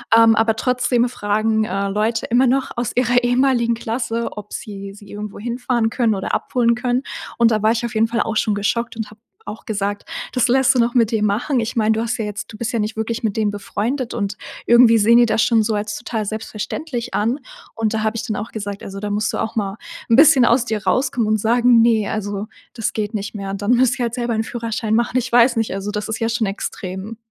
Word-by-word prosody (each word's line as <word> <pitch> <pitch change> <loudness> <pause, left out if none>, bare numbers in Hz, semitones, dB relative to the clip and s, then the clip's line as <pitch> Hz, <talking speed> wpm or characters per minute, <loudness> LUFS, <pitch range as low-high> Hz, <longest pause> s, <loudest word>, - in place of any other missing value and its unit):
ähm, 225 -1 +6
aber 225 0 +2
trotzdem 250 0 +1
fragen, 215 0 0
äh, 200 -2 -2
Leute 215 +3 0
immer 245 +2 +3
noch 265 +2 +1
aus 240 -1 -2
ihrer 245 0 +2
ehemaligen 245 -1 +2
Klasse, 230 0 -3
ob 210 0 -8
sie 200 -1 -7
sie 205 -1 -15
irgendwo 205 0 -7
hinfahren 240 0 -1
können 230 -2 +1
oder 190 - -4
abholen 235 -2 +1
können. 245 +1 -1 0.3
Und 235 -1 +4
da 215 -1 +1
war 220 +1 +4
ich 235 +1 -1
auf 235 - -5
jeden 225 +1 +3
Fall 235 0 -1
auch 225 - -2
schon 210 -2 +1
geschockt 235 +3 -1
und 220 -1 -5
habe 215 +1 -17 0.3
auch 220 - -8
gesagt: 205 -1 -3 0.3
„Das 250 -2 +2
lässt 265 +1 +4
du 250 - +2
noch 235 +1 +2
mit 230 -3 +3
dir 220 -2 0
machen? 235 +6 +1
Ich 230 +3 -3
meine, 220 -1 +2
du 220 - +1
hast 230 0 -2
ja 225 - -2
jetzt 210 -1 -5
du 215 - -9
bist 235 +1 -3
ja 230 - -1
nicht 215 +2 -2
wirklich 225 +1 -3
mit 210 -3 -1
dem 215 -2 +1
befreundet 225 +5 -3
und 205 -2 -3 0.3
irgendwie 235 -1 +6
sehen 230 +3 +5
die 240 - +6
das 220 -1 +2
schon 225 -2 +3
so 215 0 -1
als 210 0 -3
total 225 -3 -3
selbstverständlich 225 +5 -5
an.“ 230 +7 0 0.4
Und 225 -1 -1
da 220 - -1
habe 220 +1 0
ich 220 -1 -3
dann 215 - -3
auch 215 +3 -5
gesagt: 205 -2 -5
„Also, 195 0 -7
da 210 - -3
musst 210 +2 -1
du - - -2
auch 225 - -3
mal 195 -2 -1 0.3
'n 230 - +5
bisschen 270 -3 +7
aus 235 +1 +3
dir 215 -4 -3
rauskommen 230 +3 +1
und 215 0 +2
sagen, 235 +2 +4
ne, 225 -3 +3
also, 205 -1 -3 0.3
das 225 -3 -2
geht 210 0 -3
nicht 205 0 -4
mehr.“ 195 -1 -5
Und 195 +1 -5
dann 205 +4 +1
müssen 250 +1 +4
sie 245 - -1
halt 235 -1 -2
selber 240 -2 -2
'n 220 0 0
Führerschein 225 -2 -2
machen. 235 +2 +1
Ich 245 -1 -1
weiß 235 0 +5
nicht. 225 -4 0
Also, 195 +1 -4
das 210 0 -3
ist 220 0 -3
ja 225 0 0
schon 225 -2 0
extrem. 195 +1 -5
225 Hz, 245 wpm, -20 LUFS, 210-240 Hz, 0.4 s, bisschen